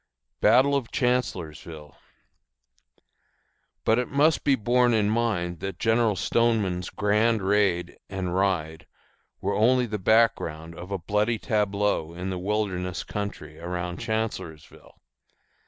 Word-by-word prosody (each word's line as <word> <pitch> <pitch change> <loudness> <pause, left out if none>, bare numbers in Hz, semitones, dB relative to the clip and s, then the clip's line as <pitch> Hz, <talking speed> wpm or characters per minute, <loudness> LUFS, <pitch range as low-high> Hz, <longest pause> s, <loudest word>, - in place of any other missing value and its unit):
BATTLE 135 +3 +5
OF 130 -5 -2
CHANCELLORSVILLE. 85 - -2 1.9
But 110 +2 +3
it 125 - -1
must 145 +3 +2
be 140 - +4
borne 120 +1 +2
in 105 -1 +2
mind 100 -7 -1
that 95 0 -5
General 115 -1 +2
Stoneman's 100 -6 0
grand 105 +1 +1
raid 95 -3 +1
and 95 -2 -3
ride 90 -5 -1 0.5
were 100 +1 -1
only 125 +5 +3
the 105 -2 -4
background 90 -7 +1
of 90 +2 -9
a 100 - -2
bloody 105 +6 0
tableau 105 -6 0
in 90 +2 -4
the 90 - -3
wilderness 95 -2 -2
country 90 -7 -6
around 90 0 -4
Chancellorsville. 110 -9 -5
100 Hz, 120 wpm, -26 LUFS, 90-115 Hz, 1.9 s, BATTLE